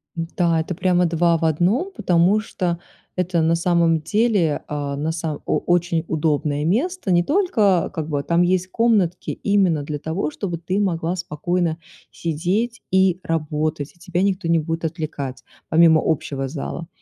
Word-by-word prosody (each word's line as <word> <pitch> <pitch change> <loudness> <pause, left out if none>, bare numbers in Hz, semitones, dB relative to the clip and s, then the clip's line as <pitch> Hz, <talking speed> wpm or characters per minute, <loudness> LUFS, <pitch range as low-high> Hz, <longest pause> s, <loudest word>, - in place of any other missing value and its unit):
Да, 165 0 0
это 170 +2 -4
прямо 180 -1 +2
2 170 0 +2
в 165 - -6
1, 185 - +1
потому 180 +4 +3
что 180 -5 -3 0.4
это 180 -2 +1
на 165 +1 +3
самом 170 -1 +2
деле 205 -4 +1
а, 145 -1 -3
на 155 +3 -1
само 160 -2 -4
о - - +1
очень 175 -2 +1
удобное 150 -2 0
место. 250 - 0
Не 175 0 +5
только, 220 - +2
как 160 -1 -3
бы 145 -1 -1
там 170 +3 +2
есть 185 +1 +2
комнатки 205 -7 +1
именно 190 -7 +1
для 150 0 -4
того, 160 0 -2
чтобы 175 -5 -4
ты 185 +4 -2
могла 175 -3 0
спокойно 170 +1 -1 0.3
сидеть 190 +9 -2
и 190 -1 +3
работать, 155 -2 -2
и - - -27
тебя 180 0 -2
никто 190 -3 0
не 165 0 +3
будет 165 +1 -3
отвлекать, 150 -5 -4 0.3
помимо 160 -1 +5
общего 140 -3 -1
зала. 160 +3 -5
170 Hz, 160 wpm, -21 LUFS, 160-185 Hz, 0.4 s, Не